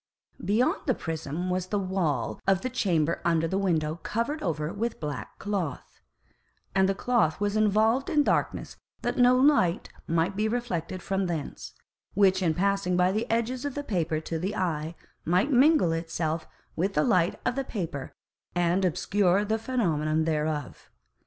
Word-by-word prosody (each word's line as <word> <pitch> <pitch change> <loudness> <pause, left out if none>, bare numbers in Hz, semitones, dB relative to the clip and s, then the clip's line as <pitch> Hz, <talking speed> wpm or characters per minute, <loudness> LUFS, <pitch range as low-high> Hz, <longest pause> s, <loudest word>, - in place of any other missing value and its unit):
Beyond 220 +5 +1
the - - +3
Prism 165 +2 -4
was 180 0 -1
the 205 - -1
Wall 185 -7 -1
of 190 -1 +3
the 255 - -3
Chamber 170 -9 +1
under 165 -1 +2
the 190 +4 -1
Window 160 -5 0
covered 235 - -2
over 155 -2 -2
with 230 +3 -3
black 150 -4 -5
Cloth, 190 -9 -4 0.7
and 190 0 +3
the 195 - +1
Cloth 235 -9 +1
was 205 0 0
involved 215 +4 +3
in 295 -1 +3
Darkness - - -1 0.3
that - - -1
no 250 +1 +6
Light 255 - +3 0.2
might 165 +4 +1
be 215 +2 +1
reflected 185 -7 -3
from 195 -1 -1
thence, 165 -4 -5 0.4
which 190 -1 +4
in 165 -4 +1
passing 195 -1 +1
by 180 +1 +3
the 220 +4 -2
Edges 235 +3 0
of 285 -2 -3
the 290 - -3
Paper 170 - -1
to 160 +1 -4
the 190 +5 -2
Eye, 160 -2 -2 0.3
might 180 - +2
mingle 275 - +5
itself 165 -1 -2 0.3
with 195 +4 -1
the 150 - +3
Light 175 +1 +2
of - - +1
the 275 - -1
Paper, 165 - -5 0.4
and 175 +2 +2
obscure 190 +2 +2
the 220 +1 0
Phænomenon 160 - 0
thereof. 155 -3 -2
185 Hz, 165 wpm, -27 LUFS, 165-215 Hz, 0.7 s, no